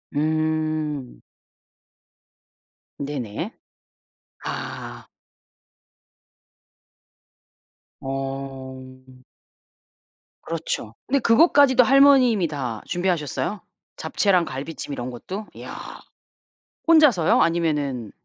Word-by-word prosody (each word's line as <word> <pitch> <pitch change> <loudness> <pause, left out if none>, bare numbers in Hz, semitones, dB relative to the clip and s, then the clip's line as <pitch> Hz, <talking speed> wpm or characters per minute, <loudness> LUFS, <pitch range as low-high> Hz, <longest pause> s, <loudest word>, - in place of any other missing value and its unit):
음. 155 -2 -1 1.8
네네. 135 -7 -4 0.9
아. - - -6 2.9
어. 130 -1 -7 1.2
그렇죠. 160 -9 -4
근데 280 +1 +2
그것까지도 260 +1 +5
할머님이 260 -7 +5
다 130 -8 -4
준비하셨어요? 175 +2 -2 0.3
잡채랑 185 -5 +1
갈비찜 145 +2 -6
이런 125 -2 -4
것도? 190 - -7
야. - - -8 1.1
혼자서요? 295 - +5
아니면은 150 -9 0
155 Hz, 150 characters per minute, -23 LUFS, 135-195 Hz, 2.9 s, 그것까지도